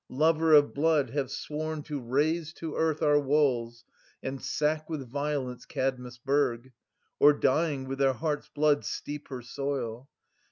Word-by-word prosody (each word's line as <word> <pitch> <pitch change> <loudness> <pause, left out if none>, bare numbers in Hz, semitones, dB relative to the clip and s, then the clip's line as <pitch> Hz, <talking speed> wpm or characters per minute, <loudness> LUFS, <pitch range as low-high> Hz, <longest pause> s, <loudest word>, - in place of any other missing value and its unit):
7 130 - -9
Lover 160 +1 +4
of 145 -1 +6
blood, 145 -4 +2
have 140 -3 -1
sworn 155 0 -4
to 150 -2 -4
raze 155 +6 0
to 160 -3 -6
earth 160 -1 0
Our 145 -1 +5
walls, 130 -5 +1 0.4
and 135 0 -4
sack 155 +2 -1
with 145 -5 -4
violence 140 -1 -3
Kadmus' 125 -2 -3
burg. 130 -2 0 0.5
Or, 145 +1 +7
dying, 145 -1 +1
with 135 +1 -4
their 135 -1 +4
hearts' 150 +2 -3
blood 150 -1 +2
steep 145 0 -5
her 130 -3 -7
soil. 130 -1 -4
145 Hz, 155 wpm, -28 LUFS, 130-155 Hz, 0.5 s, Or